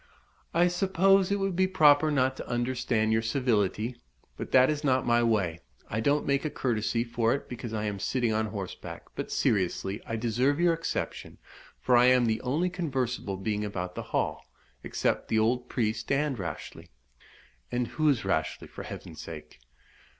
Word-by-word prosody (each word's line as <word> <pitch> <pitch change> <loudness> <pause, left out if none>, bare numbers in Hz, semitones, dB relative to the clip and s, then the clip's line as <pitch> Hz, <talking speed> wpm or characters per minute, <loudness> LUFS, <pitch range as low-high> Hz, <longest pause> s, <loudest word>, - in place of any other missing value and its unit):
"I 175 +2 +4
suppose 190 +1 +3
it 200 - +2
would 195 -2 -1
be 185 +1 +3
proper 155 -4 +5
not 130 -3 +2
to - - -7
understand 120 -2 0
your 110 - +2
civility? 115 -1 0 0.4
But - - -7
that 130 +2 +6
is 150 -1 -3
not 130 -2 +2
my 120 0 +3
way 100 -8 +1 0.3
I 110 - -1
don't 145 +6 +1
make 140 0 +1
a 155 - -1
courtesy 115 -3 -1
for 115 0 +1
it 140 - -7
because 120 -2 -6
I 110 -1 -2
am 100 -2 -3
sitting 120 +1 0
on 110 0 0
horseback. 100 -4 -7
But, - - -5
seriously, 95 +1 0
I 115 - -2
deserve 120 +6 +1
your 175 -1 +4
exception, 165 0 -4 0.4
for 125 - +3
I 120 +1 +6
am 125 -1 +5
the 110 -1 0
only 155 +8 0
conversable 130 - -2
being 105 +2 -2
about 90 -3 -4
the - - -5
Hall, - - -1 0.4
except - - -1
the 110 - +1
old 120 +3 +1
priest 110 -1 -1
and 140 0 +1
Rashleigh." 90 - -7 0.8
"And 120 0 0
who 155 -1 +1
is 120 -8 +1
Rashleigh, 80 -5 -1
for - - -9
Heaven's 80 -2 -8
sake?" 75 -4 -10
120 Hz, 175 wpm, -28 LUFS, 110-145 Hz, 0.8 s, that